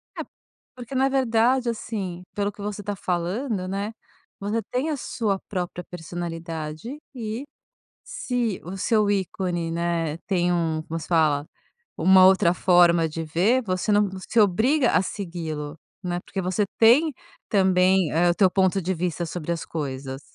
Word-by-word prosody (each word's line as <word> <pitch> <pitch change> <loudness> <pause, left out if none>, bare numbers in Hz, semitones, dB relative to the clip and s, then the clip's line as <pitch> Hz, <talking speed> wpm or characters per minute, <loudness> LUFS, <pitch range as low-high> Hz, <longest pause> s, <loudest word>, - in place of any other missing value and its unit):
É, - - -4 0.5
porque 250 +1 -8
na 265 +1 +3
verdade, 250 -1 +2
assim, 200 -6 -4
pelo 205 0 -1
que 205 - -13
você 205 0 -4
tá 205 +1 -3
falando, 185 +4 -2
né, 200 +3 -3 0.5
você 210 +3 -1
tem 260 +6 0
a 300 - -1
sua 210 -6 -2
própria 180 -2 -4
personalidade 165 - -6 0.2
e, 225 +1 -4 0.6
se 240 -5 -2
o 180 +4 -6
seu 210 +1 +2
ícone, 180 -3 -1
né, 165 -2 -1
tem 180 -2 +1
um 165 -2 0
como 165 +1 -5
se - - -9
fala? 155 -4 +2 0.5
Uma 185 +2 +7
outra 190 -2 +4
forma 175 -2 +4
de 165 +1 -5
ver, 190 +11 +2
você 185 -1 -1
não 205 0 +4 0.2
se 235 - 0
obriga 235 - +3
a - - +4
segui-lo, 165 -6 -5 0.2
né, 175 -1 -2
porque 195 - -5
você 185 +3 0
tem 265 +8 +6 0.4
também 190 -3 +3
eh 175 +2 +3
o - - +1
teu 190 -1 +4
ponto 190 +1 +2
de 185 +2 -1
vista 175 0 -2
sobre 170 0 -4
as 165 - -4
coisas. 135 -3 -5
185 Hz, 155 wpm, -24 LUFS, 170-215 Hz, 0.6 s, Uma